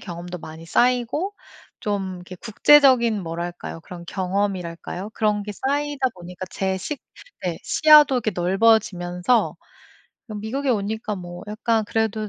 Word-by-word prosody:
경험도 175 Hz, 0 st, -7 dB
많이 160 Hz, 0 st, -10 dB
쌓이고 250 Hz, -, +1 dB, 0.4 s
좀 195 Hz, -3 st, -2 dB
이렇게 180 Hz, +1 st, -10 dB
국제적인 235 Hz, -1 st, +4 dB
뭐랄까요 170 Hz, 0 st, -5 dB
그런 170 Hz, +1 st, -10 dB
경험이랄까요? 190 Hz, 0 st, -3 dB
그런 210 Hz, -2 st, 0 dB
게 210 Hz, -, -5 dB
쌓이다 280 Hz, +2 st, -1 dB
보니까 180 Hz, +1 st, -8 dB
제 190 Hz, -1 st, -1 dB
시 280 Hz, +10 st, -4 dB, 0.5 s
네 170 Hz, -2 st, -2 dB
시야도 300 Hz, -3 st, +6 dB
이렇게 220 Hz, -4 st, -1 dB
넓어지면서 185 Hz, +1 st, +2 dB, 0.7 s
뭐 215 Hz, -3 st, -7 dB
미국에 260 Hz, +7 st, -3 dB
오니까 215 Hz, -1 st, -1 dB
뭐 175 Hz, -2 st, -8 dB
약간 220 Hz, +1 st, 0 dB
그래도 220 Hz, 0 st, -1 dB
205 Hz, 315 characters per minute, -23 LUFS, 180-235 Hz, 0.7 s, 시야도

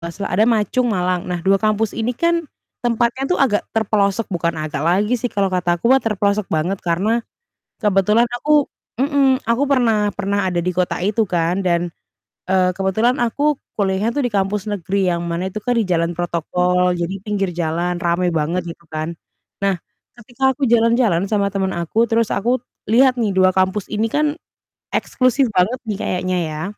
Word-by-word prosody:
enggak 170 Hz, 0 st, -6 dB
salah 200 Hz, -, -5 dB
ada 210 Hz, +4 st, +4 dB
Ma 225 Hz, -3 st, +3 dB
Chung 255 Hz, -1 st, +1 dB
Malang. 180 Hz, -1 st, 0 dB
Nah, 175 Hz, -1 st, -2 dB
2 195 Hz, +1 st, +4 dB
kampus 215 Hz, 0 st, +1 dB
ini 230 Hz, +2 st, -1 dB
kan 335 Hz, +2 st, +1 dB, 0.4 s
tempatnya 240 Hz, +2 st, +1 dB
tuh 360 Hz, -, +1 dB
agak 235 Hz, -7 st, +2 dB
terpelosok, 210 Hz, -1 st, +1 dB
bukan 170 Hz, -2 st, -1 dB
agak 155 Hz, -2 st, -3 dB
lagi 205 Hz, +7 st, +2 dB
sih 245 Hz, +2 st, -2 dB
kalau 200 Hz, -2 st, +1 dB
kata 175 Hz, -1 st, +1 dB
aku 235 Hz, -, +2 dB
mah 270 Hz, -, +5 dB
terpelosok 205 Hz, -2 st, 0 dB
banget 170 Hz, +5 st, 0 dB
karena 200 Hz, +8 st, +1 dB, 0.6 s
kebetulan 210 Hz, +3 st, +3 dB
aku 295 Hz, +2 st, +3 dB, 0.3 s
mhm, 275 Hz, -1 st, +3 dB
aku 235 Hz, +4 st, +1 dB
pernah 225 Hz, -6 st, +2 dB
pernah 200 Hz, -1 st, 0 dB
ada 175 Hz, -, -1 dB
di 180 Hz, -, 0 dB
kota 180 Hz, 0 st, 0 dB
itu 210 Hz, +3 st, +1 dB
kan 175 Hz, +2 st, 0 dB
dan, 175 Hz, -1 st, 0 dB, 0.6 s
eee, 185 Hz, -1 st, +3 dB
kebetulan 220 Hz, +6 st, +1 dB
aku 290 Hz, +5 st, +1 dB, 0.2 s
kuliahnya 200 Hz, +2 st, +1 dB
tuh 290 Hz, -, 0 dB
di -, -, -3 dB
kampus 195 Hz, +1 st, 0 dB
negeri 195 Hz, 0 st, -1 dB
yang 170 Hz, -1 st, -1 dB
mana 170 Hz, +2 st, -2 dB
itu 210 Hz, -, -5 dB
kan 245 Hz, -, 0 dB
di 225 Hz, -, +2 dB
jalan 170 Hz, -1 st, 0 dB
protokol, 180 Hz, +1 st, 0 dB
jadi 175 Hz, +2 st, -2 dB
pinggir 200 Hz, -3 st, -1 dB
jalan 170 Hz, +1 st, -1 dB
rame 175 Hz, +1 st, +1 dB
banget 165 Hz, +3 st, 0 dB
gitu 170 Hz, -, -12 dB
kan. 155 Hz, +2 st, -4 dB, 0.5 s
Nah, 195 Hz, -2 st, +1 dB, 0.4 s
ketika 260 Hz, +3 st, 0 dB
aku 275 Hz, 0 st, -1 dB
jalan-jalan 230 Hz, -5 st, +3 dB
sama 200 Hz, -2 st, +2 dB
temen 190 Hz, -1 st, 0 dB
aku 170 Hz, +7 st, +1 dB
terus 230 Hz, -1 st, +2 dB
aku 240 Hz, +4 st, 0 dB, 0.3 s
lihat 255 Hz, +2 st, +5 dB
nih 220 Hz, -4 st, 0 dB
2 185 Hz, 0 st, +5 dB
kampus 190 Hz, +1 st, +1 dB
ini 215 Hz, +1 st, 0 dB
kan 300 Hz, 0 st, +1 dB, 0.6 s
eksklusif 255 Hz, +1 st, +1 dB
banget 215 Hz, +8 st, +2 dB
nih 210 Hz, -, -2 dB
kayaknya 185 Hz, 0 st, -1 dB
ya. 155 Hz, +1 st, -5 dB
200 Hz, 180 wpm, -19 LUFS, 180-230 Hz, 0.6 s, mah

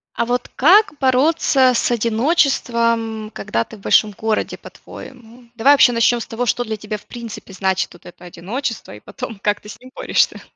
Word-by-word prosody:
А 235 Hz, -, -1 dB
вот 245 Hz, 0 st, -2 dB
как 370 Hz, +3 st, +4 dB
бороться 265 Hz, 0 st, +3 dB
с 235 Hz, -, 0 dB
одиночеством, 230 Hz, -3 st, 0 dB
когда 115 Hz, -, -2 dB
ты -, -, -13 dB
в -, -, -18 dB
большом 210 Hz, +2 st, +3 dB
городе, 220 Hz, +2 st, -2 dB
по-твоему? 245 Hz, -1 st, -13 dB
Давай 255 Hz, +5 st, +5 dB
вообще 265 Hz, -3 st, +5 dB
начнем 235 Hz, +1 st, +2 dB
с -, -, -6 dB
того, 230 Hz, +2 st, -3 dB
что 245 Hz, +2 st, 0 dB
для 220 Hz, -1 st, -4 dB
тебя 210 Hz, 0 st, -6 dB
в -, -, -22 dB
принципе 225 Hz, -4 st, -9 dB
значит 190 Hz, 0 st, -1 dB
вот 175 Hz, -, -18 dB
это 175 Hz, 0 st, -14 dB
одиночество, 215 Hz, +8 st, -5 dB
и -, -, -14 dB
потом, 240 Hz, -, -8 dB
как 205 Hz, +1 st, -1 dB
ты 210 Hz, -, -14 dB
с -, -, -10 dB
ним 255 Hz, +1 st, -15 dB
борешься. -, -, 0 dB
230 Hz, 190 wpm, -19 LUFS, 215-255 Hz, -, Давай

